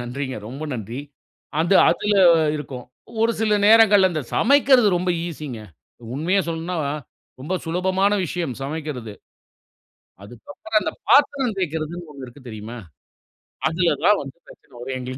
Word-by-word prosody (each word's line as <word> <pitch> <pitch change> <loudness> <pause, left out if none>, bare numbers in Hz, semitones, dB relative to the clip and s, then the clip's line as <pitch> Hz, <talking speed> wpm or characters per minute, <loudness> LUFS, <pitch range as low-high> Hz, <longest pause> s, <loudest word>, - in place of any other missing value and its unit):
நன்றிங்க 130 +1 -5
ரொம்ப 135 +5 -8
நன்றி. 115 +3 -6 0.6
அது 170 +4 +2 0.2
அதுல 210 0 0 0.4
இருக்கும். 130 -4 -7 0.4
ஒரு 230 +1 +3
சில 215 -1 +2
நேரங்கள்ல 210 -3 +6
அந்த 155 -3 -2
சமைக்கிறது 270 -5 +4
ரொம்ப 180 +1 -1 0.2
ஈசிங்க. 150 -8 -7 0.6
உண்மையா 175 +8 +1
சொல்லனுனா 165 +2 -3 0.6
ரொம்ப 155 +8 -3
சுலபமான 190 +4 +1
விஷயம் 165 -6 -3
சமைக்கிறது. 140 -7 -5 1.1
அதுக்கு 110 - -14
அப்புறம் 220 +2 -1
அந்த - - -2 0.2
பாத்திரம் 275 -5 +3
தேய்க்கிறதுன்னு 165 0 -4
ஒண்ணு 135 -2 -9
இருக்கு 125 +1 -15
தெரியுமா? 110 +2 -8 0.9
அதுல 165 -1 +1
தான் 210 0 +5
வந்து 135 +1 -9
பிரச்சனை 135 - -18
வரும் 130 +1 -5
எங்களுக்கு. 130 +1 -6
160 Hz, 130 wpm, -22 LUFS, 130-195 Hz, 1.1 s, நேரங்கள்ல